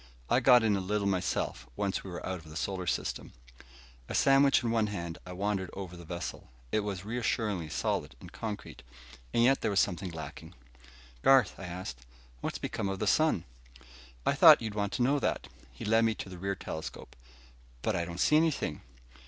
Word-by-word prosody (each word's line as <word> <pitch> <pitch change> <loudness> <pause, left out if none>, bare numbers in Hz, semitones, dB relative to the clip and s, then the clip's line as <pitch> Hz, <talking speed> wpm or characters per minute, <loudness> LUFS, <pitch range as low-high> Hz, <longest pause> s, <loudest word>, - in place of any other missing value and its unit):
I 125 - +5
got 125 -2 +6
in 105 -2 +3
a - - 0
little 100 +2 -1
myself, 95 -8 -1
once 95 +5 -1
we 95 - -8
were 90 - -6
out 95 -1 -3
of 80 - -16
the 75 - -11
solar 90 +1 -3
system." - - -2 0.8
A - - -3
sandwich 135 -1 +5
in 115 - 0
one 110 -2 +2
hand, 85 -5 -5
I 90 - -6
wandered 95 0 -1
over 95 -3 -6
the 85 -1 -11
vessel. 85 -5 -6 0.2
It - - +2
was 100 -3 -4
reassuringly 110 -6 -1
solid 80 - -2
and 90 - -12
concrete. 105 0 -6 0.5
And 115 - +3
yet 135 +3 +4
there - - +1
was 100 -1 +2
something 95 0 0
lacking. 80 -2 -8 0.7
"Garth," 135 -6 +5
I 95 - -6
asked, 90 -7 -6 0.4
"what's - - -3
become 100 - -3
of 95 - -2
the 105 - -2
sun?" 150 - +3 0.8
"I - - +3
thought - - +9
you'd 110 -2 -4
want 100 -1 -1
to 120 - +1
know 140 +3 +3
that." - - -1 0.2
He - - -8
led 110 +2 +4
me 115 -1 +2
to 95 - -7
the 90 -1 -9
rear 100 +1 -1
telescope. 80 -3 -7 0.7
"But - - +1
I 85 - 0
don't 85 0 -6
see 150 - +5
anything." 155 - 0
100 Hz, 195 wpm, -30 LUFS, 90-115 Hz, 0.8 s, thought